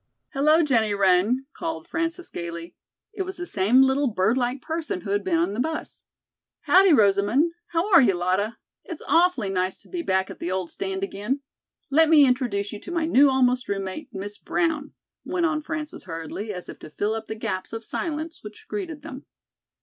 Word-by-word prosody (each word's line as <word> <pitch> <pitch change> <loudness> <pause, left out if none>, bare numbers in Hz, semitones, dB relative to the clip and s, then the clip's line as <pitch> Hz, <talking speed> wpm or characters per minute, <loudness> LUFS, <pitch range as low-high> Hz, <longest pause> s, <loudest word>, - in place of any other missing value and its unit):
"Hello, 305 +4 +3
Jennie 225 -8 +2
Wren!" 200 +7 +3
called 330 0 -5
Frances 335 +1 -3
gayly. 170 0 -6 0.4
It 400 - -4
was 380 0 -4
the 355 - -4
same 230 - +4
little 270 +2 +2
bird 215 0 +1
like 250 +1 -1
person 315 - -4
who 195 - -5
had 205 0 +1
been 175 -4 +1
in 175 +4 +1
the 215 - -4
bus. 315 +5 -4 0.6
"Howdy, 380 0 +5
Rosamond. 215 - +4 0.2
How 335 +3 0
are 340 - +9
you, 205 -7 +3
Lotta? 185 +6 0 0.3
It's 340 - -8
awfully 330 - +3
nice 185 0 -1
to - - -21
be 355 -2 -3
back 190 - 0
at - - -11
the 175 - -3
old 185 -2 -2
stand 190 0 -3
again. 210 +8 -3 0.5
Let 315 +2 +5
me 305 -3 +7
introduce 240 -6 0
you 210 - -6
to 350 - -9
my 335 -2 0
new 285 -3 +5
almost 255 -1 +2
roommate, 195 +9 -4
Miss 205 0 -6
Brown," 320 -4 -1 0.3
went 355 -2 -1
on 310 -1 0
Frances 305 0 -6
hurriedly, 165 +5 -5
as 180 -3 -7
if - - -10
to - - -10
fill 205 +7 -1
up 220 0 -5
the 220 - -4
gaps 185 -4 -4
of 225 0 -6
silence 320 0 -4
which 210 0 -11
greeted 335 -8 -5
them. 280 -4 -9
250 Hz, 195 wpm, -24 LUFS, 195-320 Hz, 0.6 s, are